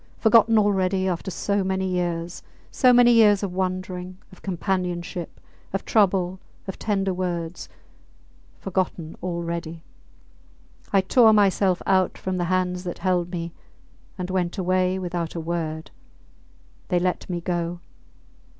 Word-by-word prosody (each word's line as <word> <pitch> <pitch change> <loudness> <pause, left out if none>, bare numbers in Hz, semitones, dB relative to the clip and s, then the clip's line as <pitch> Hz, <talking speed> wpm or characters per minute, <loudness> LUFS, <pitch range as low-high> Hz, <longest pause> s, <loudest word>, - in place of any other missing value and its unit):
Forgotten 225 0 +5
already 190 -2 +2
after 180 +1 -2
so 200 +2 -1
many 190 0 -1
years 175 -1 -2 0.3
so 255 -2 +5
many 245 0 +6
years 210 -3 +5
of 190 -3 -3
wandering, 185 0 -3
of 185 - -16
companionship, 180 -2 -3 0.3
of 195 - -2
trouble, 190 -3 +2 0.3
of 190 - -6
tender 195 -3 0
words! 175 -2 -4 0.9
Forgotten 180 -4 -3
already!... 170 -2 -4 1.1
I 195 - +4
tore 220 +3 +5
myself 195 -3 +3
out 185 -1 +2
from 185 -1 -3
the 175 - 0
hands 180 0 0
that 175 -2 -5
held 180 -2 0
me 170 -2 -5 0.6
and 180 0 -4
went 180 -2 -1
away 185 0 +1
without 175 -3 -3
a - - -2
word... 160 -1 -4 1.0
They 180 - +1
let 180 +1 -1
me 175 -1 -2
go. 175 0 -2
185 Hz, 130 wpm, -24 LUFS, 175-190 Hz, 1.1 s, many